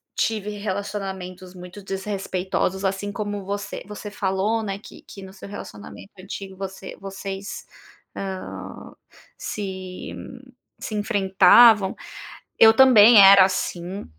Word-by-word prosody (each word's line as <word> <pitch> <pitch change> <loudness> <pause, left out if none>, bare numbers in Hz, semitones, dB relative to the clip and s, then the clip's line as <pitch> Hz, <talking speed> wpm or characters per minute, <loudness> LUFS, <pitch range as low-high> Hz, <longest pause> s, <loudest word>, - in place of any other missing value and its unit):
tive 215 -2 -1
relacionamentos 190 -2 -6
muito 180 +2 -11
desrespeitosos, 190 -1 -3
assim, 195 +1 -2
como 205 -1 -5
você 200 0 -5
você 210 0 -8
falou, 210 +1 -1
né, 195 -2 -4
que - - -14
que 200 - -12
no 190 0 -11
seu 195 - -11
relacionamento 205 0 -10
antigo 190 0 -8
você 190 0 -8
vocês, 195 0 -7 0.5
ah, 190 -1 -7 0.4
se 190 -3 -6 0.7
se 220 - -7
enfrentavam, 205 0 +5 0.6
eu 225 0 +7
também 235 -3 +7
era 195 0 +9
assim, 185 0 -3
195 Hz, 110 wpm, -23 LUFS, 190-205 Hz, 0.7 s, era